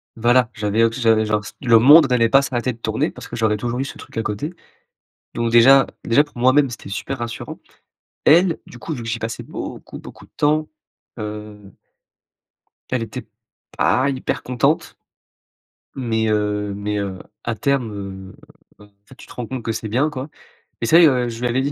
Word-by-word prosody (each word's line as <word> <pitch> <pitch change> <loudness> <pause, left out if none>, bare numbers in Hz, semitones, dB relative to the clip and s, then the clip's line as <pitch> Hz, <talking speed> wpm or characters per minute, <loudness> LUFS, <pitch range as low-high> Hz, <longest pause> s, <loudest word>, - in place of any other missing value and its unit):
Voilà, 120 +1 +3
j'avais 110 +1 +1
auss 115 +2 +1
j'avais 110 -2 +3
genre 105 0 0
s - - -10
le 115 -4 +5
monde 145 +4 +7
n'allait 120 -2 +3
pas 135 +2 +5
s'arrêter 130 -2 -2
de - - -16
tourner 115 - -1
parce - - -11
que - - -7
j'aurais 110 -2 +1
toujours 120 +3 -3
eu 135 - -1
ce - - -8
truc - - -12
à 115 - 0
côté. 110 - -4 0.8
Donc 115 0 -1
déjà 135 +3 +7 0.2
déjà, 140 +6 +4
pour 145 -4 -16
moi-même, 130 +3 +4
c'était 115 - -9
super 130 +7 -4
rassurant. 115 -1 -6 0.7
Elle, 170 +2 +5
du 120 - -13
coup, 160 - -5
vu 125 - -6
que - - -7
j'y 115 +1 -2
passais 115 0 -5
beaucoup - - -8
beaucoup - - -13
de - - -30
temps, 155 +1 +1 0.5
heu 105 -1 -8 1.2
elle 130 -3 -1
était 110 0 -8 0.5
pas 130 +2 +2
hyper 130 -2 -3
contente. 125 -2 0 1.0
Mais 115 -4 -1
heu, 105 -1 -1
mais 105 +1 -3
heu, 95 -2 -4 0.2
à 120 - -2
terme, 135 -4 0 0.4
heu, - - -15 0.4
enfin, 105 - -15
en 100 0 -45
fait, 130 - -15
tu - - -14
te - - -13
rends 120 -2 -5
compte 130 -1 -5
que 115 - -2
c'est 110 0 -4
bien, 130 +8 +1
quoi, 140 0 -6 0.5
et - - 0
ça 165 +8 +6
y - - +7
est, - - +8
heu, 125 -4 +1
je 115 -1 -7
lui 125 - +1
avais 125 +2 0
dit 140 +2 -1
120 Hz, 205 wpm, -20 LUFS, 110-130 Hz, 1.2 s, est